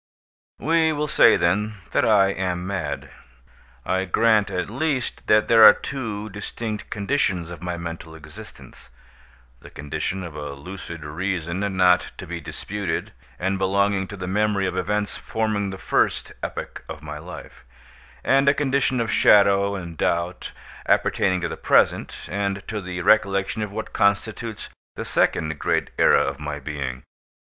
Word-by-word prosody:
We 160 +2 +2
will 150 0 -1
say, - - +6
then, 100 +5 +1 0.2
that - - +2
I 100 -3 +5
am 90 -2 -2
mad. 85 -7 -4 0.7
I 95 +1 0
grant, 110 +1 +3
at 90 -2 -2
least, 135 +2 -2
that 105 0 +4
there 115 -1 +7
are - - +11
two 110 -6 -5
distinct 105 +2 -5
conditions 100 -6 -1
of 85 - -9
my 90 -1 -3
mental 85 -1 -7
existence—the 65 -4 -16
condition 80 +6 -4
of 85 -3 -7
a 75 -1 -5
lucid 85 +1 -8
reason, 85 +2 -3 0.2
not 90 -1 +3
to - - -7
be - - -6
disputed, 100 -1 -4 0.2
and 95 +2 -1
belonging 100 0 +1
to 105 - -8
the 90 - -5
memory 100 +1 +1
of 90 -1 -2
events 105 +2 -1
forming 110 -3 -2
the 95 - -6
first - - 0
epoch - - -6
of 75 - -8
my 75 0 -7
life—and 90 - -3
a 140 - +3
condition 135 -3 +1
of 115 -1 -1
shadow 100 -1 +5
and 85 -4 -7
doubt, 85 +1 -1 0.4
appertaining 95 -1 +2
to - - -1
the - - -6
present, - - +2
and 100 0 -3
to 105 -1 -3
the 90 -1 -5
recollection 100 +1 +2
of 105 -2 -3
what 110 +2 -6
constitutes 110 +2 0 0.3
the - - -5
second 80 -1 0
great - - 0
era - - +5
of 70 +1 -3
my 75 -1 -5
being. 70 -3 -5
95 Hz, 150 wpm, -23 LUFS, 85-105 Hz, 0.7 s, are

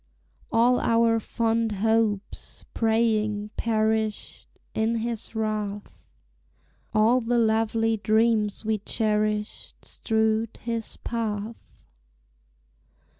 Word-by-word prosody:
All 240 +2 +4
our 230 0 +3
fond 225 0 0
hopes, 210 -1 -1
praying, 215 -2 +1
perished 220 -1 -1 0.3
In 220 +1 0
his 230 0 -4
wrath, 210 -2 -4 0.8
All 225 +4 +3
the 240 +1 0
lovely 225 0 +2
dreams 215 0 +1
we 220 -1 0
cherished 210 0 -1
Strewed 220 0 -1
his 230 -1 -4
path. 215 - -5
220 Hz, 80 wpm, -25 LUFS, 215-230 Hz, 0.8 s, All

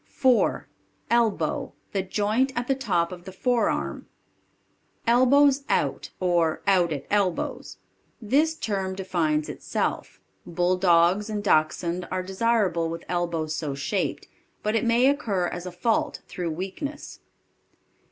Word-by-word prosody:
4. 255 -3 +2 0.4
ELBOW. 235 -3 +1 0.2
The 195 - 0
joint 215 +7 0
at 240 0 -2
the 270 - +3
top 190 -11 0
of 180 -1 -9
the 190 - -7
forearm. 240 +5 -1 1.0
Elbows 270 +4 +4
Out - - 0
or 170 -3 +1
"Out 185 -4 +3
at 145 -2 -4
Elbows." 200 -4 -1 0.4
This 290 +9 +2
term 195 -7 -2
defines 165 -5 0
itself. - - -3 0.2
Bulldogs 180 +3 +2
and 210 -1 -3
Dachshunde 170 0 +1
are 185 0 -2
desirable 190 -4 +1
with 165 +1 -6
elbows 170 -3 -1
so 150 -3 -3
shaped, 140 -1 -2 0.4
but 215 +1 0
it 225 - +1
may 235 +2 +4
occur 220 -10 +1
as 175 +1 -5
a - - -5
fault 220 +6 -1
through 175 -3 -4
weakness. 195 - -6
190 Hz, 125 wpm, -25 LUFS, 175-230 Hz, 1.0 s, Elbows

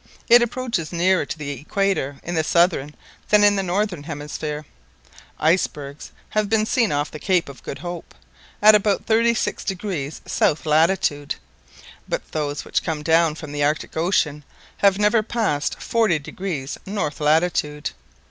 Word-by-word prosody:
It 240 +1 +8
approaches 240 -8 -2
nearer 180 -2 +2
to - - -5
the 145 -2 -5
equator 150 - -1
in 175 - -4
the 160 -2 +1
southern 165 -4 +2 0.3
than 210 0 +5
in 205 0 +6
the 195 - +1
northern 190 -2 -1
hemisphere. 150 0 -5 0.7
Icebergs 150 -4 -1 0.2
have 215 -1 0
been 215 -1 +2
seen 230 -1 +1
off 145 +1 -1
the 155 - -8
Cape 180 +2 +1
of 140 -1 -11
Good - - -6
Hope, 175 -1 -7 0.5
at 215 +1 +9
about 205 -1 +2
thirty 230 +1 +3
six - - -2
degrees 180 -7 -4
south 155 - +1
latitude, 155 -2 +2 0.7
but - - -3
those 145 -2 -3
which - - 0
come 155 -2 -3
down 165 0 +3
from 155 -2 -8
the 145 0 -1
Arctic 150 +2 -1
Ocean 160 -3 +1 0.3
have 195 -1 +4
never 210 +2 +3
passed 215 -10 -1
forty 220 -8 +2
degrees 150 -2 -5
north 160 -8 -3
latitude. 150 -1 +1
165 Hz, 155 wpm, -22 LUFS, 150-200 Hz, 0.7 s, at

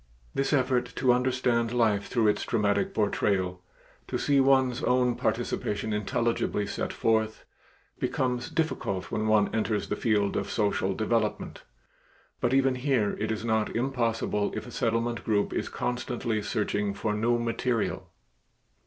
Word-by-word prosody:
This 135 - 0
effort 130 -3 +1
to 125 -1 +3
understand 125 -2 +1
life 110 -4 +2
through 115 -4 +2
its 105 - 0
dramatic 115 - +1
portrayal, 95 -3 0 0.5
to - - -2
see 140 -1 +2
one's 130 -2 +3
own 125 -1 +2
participation 105 -1 -1
intelligibly 105 0 0
set 100 - -3
forth, 110 -1 0 0.5
becomes 125 -2 -1
difficult 130 - -2
when 110 0 -1
one 105 -1 +3
enters 110 -2 -1
the - - 0
field 105 -3 +1
of - - -2
social 100 -3 0
development, 110 -1 -1 0.8
but - - +1
even 135 0 +3
here 125 -5 +1
it 110 +1 -1
is 110 +1 -3
not 110 -1 0
impossible 115 -4 0
if - - -4
a - - -10
Settlement 115 +1 -1
group 105 -2 +1
is - - -2
constantly 120 -3 -2
searching 105 -1 -1
for 105 +1 -1
new 115 +3 +1
material. 115 0 -1
115 Hz, 140 wpm, -28 LUFS, 105-125 Hz, 0.8 s, to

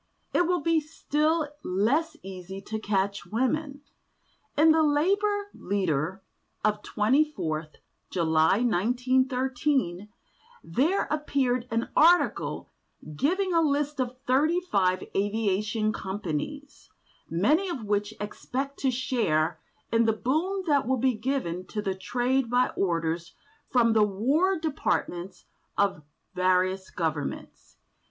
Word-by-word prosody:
It 350 - +3
will 355 -2 +1
be 330 +1 +3
still 310 +1 0 0.2
less 285 - +1
easy 190 0 -7
to 220 +2 -5
catch 200 -1 -1
women. 275 +5 -1 0.8
In 315 +2 +6
the 320 0 +4
Labour 400 +7 +1
Leader 185 -2 -1 0.4
of 210 0 +1
24th 210 - 0 0.3
July 160 +3 +2
1913 250 -1 +1 0.5
there 290 - +1
appeared 265 -5 0
an 230 +1 -1
article 345 +3 +3 0.4
giving 370 - +1
a 330 - +4
list 295 -1 0
of 255 0 -2
thirty 300 +7 +3
five 185 - +1
aviation 210 +1 0
companies, 205 - -5 0.4
many 295 - +2
of 270 -10 -4
which 205 +1 -1
expect 265 +6 -4
to 270 - +1
share 220 -11 0 0.3
in 230 0 +3
the 225 - +3
boom 325 - -1
that 285 -6 +2
will 260 0 +2
be 255 +1 +2
given 215 -7 -2
to 215 - -5
the 195 -2 -1
trade 245 +6 0
by 250 +1 +3
orders 170 -2 -2 0.3
from 235 -3 +4
the 220 - +4
war 275 - +2
departments 195 - -2 0.3
of 200 -6 +1 0.3
various 185 +1 +1
governments. 155 -4 -4
240 Hz, 115 wpm, -27 LUFS, 190-295 Hz, 0.8 s, In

